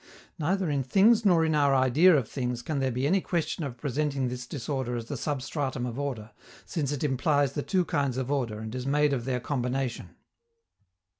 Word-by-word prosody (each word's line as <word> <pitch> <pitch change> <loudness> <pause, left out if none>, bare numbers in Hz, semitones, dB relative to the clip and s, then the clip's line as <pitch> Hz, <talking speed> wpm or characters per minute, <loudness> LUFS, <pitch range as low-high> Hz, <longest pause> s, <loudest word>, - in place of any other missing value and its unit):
Neither 185 +4 0
in 140 -1 +1
things 210 - +4
nor 170 -4 +5
in 160 - +1
our 140 -2 +3
idea 140 +7 +5
of 125 -6 -1
things 125 -3 -3
can 150 0 -2
there 135 -1 +1
be 125 +2 -1
any 185 +6 +3
question 165 -2 -2
of 130 -4 -5
presenting 140 0 -1
this 125 0 -6
disorder 130 -2 -3
as 115 -1 -4
the 140 - -5
substratum 135 -1 -3
of 125 +2 -5
order, 120 -6 -4 0.3
since 145 -4 -2
it 145 -1 -3
implies 145 0 +1
the 145 - -2
two 185 +3 +1
kinds 140 -4 -1
of 130 +1 -2
order 120 -7 -1
and 110 0 -6
is 130 0 -4
made 145 +1 +2
of 120 -3 -2
their 130 -1 -1
combination. 125 -1 -3
135 Hz, 200 wpm, -28 LUFS, 125-150 Hz, 0.3 s, nor